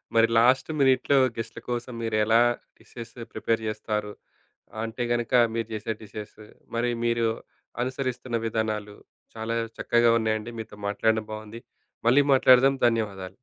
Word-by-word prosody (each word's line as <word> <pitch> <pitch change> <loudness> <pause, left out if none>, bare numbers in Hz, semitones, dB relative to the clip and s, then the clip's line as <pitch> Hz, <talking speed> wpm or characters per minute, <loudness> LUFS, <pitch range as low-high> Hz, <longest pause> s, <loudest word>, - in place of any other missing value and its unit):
మరి 115 0 +6
లాస్ట్ 130 +4 +3
మినిట్‌లో 135 +1 +3 0.2
గెస్ట్‌ల 115 0 -5
కోసం 120 +1 -3
మీరు 115 -1 -2
ఎలా 115 +2 +5 0.4
డిషెస్ 115 -1 -11 0.2
ప్రిపేర్ 115 -1 -1
చేస్తారు, 105 -1 -3 0.7
అంటే 115 +2 -3
గనుక 120 +1 -1 0.2
మీరు 115 -1 -2
చేసే 110 +1 -3
డిషెస్ 105 0 -9 0.4
మరి 120 +1 +1 0.2
మీరు 115 -1 +2 0.6
అనుసరిస్తున్న 130 -2 -3
విధానాలు 105 -2 -2 0.4
చాలా 115 +1 -3 0.2
చక్కగా 120 0 +3
ఉన్నాయండి. 110 0 -1
మీతో 110 -1 -8
మాట్లాడడం 110 +1 +1
బాగుంది. 110 +2 -8 0.5
మళ్ళీ 140 +4 +6
మాట్లాడదాం 130 +1 +6
ధన్యవాదాలు. 100 -5 -2
115 Hz, 125 wpm, -26 LUFS, 110-120 Hz, 0.7 s, మరి